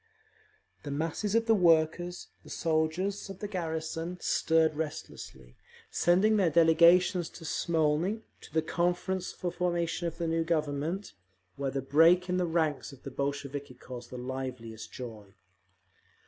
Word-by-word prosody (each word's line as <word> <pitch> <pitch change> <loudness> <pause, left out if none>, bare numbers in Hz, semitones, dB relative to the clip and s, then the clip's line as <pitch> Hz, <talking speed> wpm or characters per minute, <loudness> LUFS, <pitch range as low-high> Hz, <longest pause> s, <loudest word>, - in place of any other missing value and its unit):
The 145 - -7
masses 165 +8 -1
of 230 0 +3
the 225 - +4
workers, 175 -1 +2
the - - -14
soldiers 170 +6 -1
of 195 - -7
the 205 - -5
garrison, 165 -2 -3
stirred 160 -2 +2
restlessly, 145 - -7 0.4
sending 195 +5 +3
their 190 -4 +3
delegations 170 +2 +5
to 165 - -11
Smolny, 165 +6 +1 0.2
to - - -13
the 160 +1 +1
Conference 180 +3 -1
for 175 - -4
Formation 175 -1 -1
of 165 - -5
the 170 - -2
New 165 0 +1
Government, 160 - -2 0.4
where 140 -1 -2
the 135 -1 -3
break 165 +6 +5
in 180 - +1
the 180 -1 +1
ranks 160 -4 0
of 140 - -15
the 135 - -6
Bolsheviki 140 0 -4
caused 125 -1 -9
the 125 - -7
liveliest 125 -3 -6
joy. 110 -6 -9
165 Hz, 145 wpm, -30 LUFS, 140-180 Hz, 0.4 s, delegations